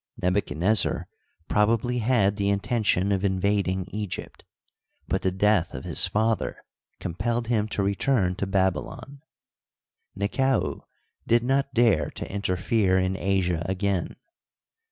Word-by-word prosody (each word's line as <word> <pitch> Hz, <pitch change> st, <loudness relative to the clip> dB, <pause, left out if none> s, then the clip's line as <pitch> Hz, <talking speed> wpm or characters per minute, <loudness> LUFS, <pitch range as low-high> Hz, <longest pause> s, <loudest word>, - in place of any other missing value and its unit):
Nebu 90 Hz, +3 st, +2 dB
chadnezzar 90 Hz, +6 st, +1 dB, 0.4 s
probably 115 Hz, +3 st, +1 dB
had 110 Hz, -4 st, +2 dB
the 100 Hz, -1 st, 0 dB
intention 100 Hz, -1 st, +1 dB
of 95 Hz, -1 st, 0 dB
invading 95 Hz, -1 st, 0 dB
Egypt, 105 Hz, -2 st, -6 dB, 0.6 s
but -, -, 0 dB
the 95 Hz, -, +1 dB
death 100 Hz, -1 st, +1 dB
of -, -, -6 dB
his -, -, +3 dB
father 110 Hz, +1 st, 0 dB, 0.4 s
compelled 115 Hz, +7 st, -2 dB
him 110 Hz, -3 st, +1 dB
to 105 Hz, -2 st, -2 dB
return 100 Hz, -1 st, +1 dB
to 100 Hz, -, -2 dB
Babylon. 95 Hz, +8 st, -2 dB, 1.0 s
Nekau 130 Hz, +7 st, 0 dB, 0.5 s
did 115 Hz, 0 st, +3 dB
not 135 Hz, +2 st, 0 dB
dare 110 Hz, -11 st, +3 dB
to -, -, -6 dB
interfere 95 Hz, 0 st, +1 dB
in 95 Hz, 0 st, 0 dB
Asia 95 Hz, -4 st, 0 dB
again. 95 Hz, -2 st, -1 dB
100 Hz, 120 wpm, -25 LUFS, 95-115 Hz, 1.0 s, his